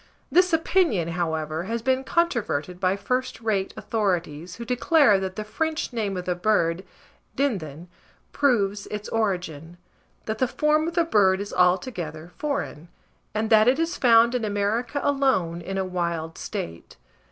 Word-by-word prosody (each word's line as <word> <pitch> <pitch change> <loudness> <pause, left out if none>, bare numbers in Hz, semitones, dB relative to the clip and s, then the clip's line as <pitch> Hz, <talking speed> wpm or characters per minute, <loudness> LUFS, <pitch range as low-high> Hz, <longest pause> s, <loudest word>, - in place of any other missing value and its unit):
This 360 +1 +4
opinion, 325 - +2
however, 160 -1 -2
has 230 +2 -3
been 260 +1 +1
controverted 230 - -1
by 185 0 +2
first 250 +5 -2
rate 210 -4 -1
authorities, 180 -6 -2
who 235 - -7
declare 250 -2 +4
that 190 -1 -4
the 215 - -4
French 315 +6 -2
name 205 -5 -2
of 180 - -5
the 180 - 0
bird, 180 -2 +1 0.5
dindon, 175 - -2 0.4
proves 210 -8 +1
its 210 0 -5
origin; 175 -7 -2 0.5
that 220 0 -3
the 255 - +2
form 305 +4 +1
of 335 - -4
the 340 - +4
bird 195 - +3
is 200 0 -6
altogether 180 - 0
foreign, 280 - -3 0.5
and 220 +1 -1
that 215 0 +6
it 255 +2 +4
is 330 +2 -1
found 235 -1 +5
in 250 -2 -1
America 215 +6 -1
alone 260 -13 +1
in 195 +3 -5
a 190 - 0
wild 170 -3 -3
state. 85 0 -6
205 Hz, 150 wpm, -25 LUFS, 175-255 Hz, 0.5 s, that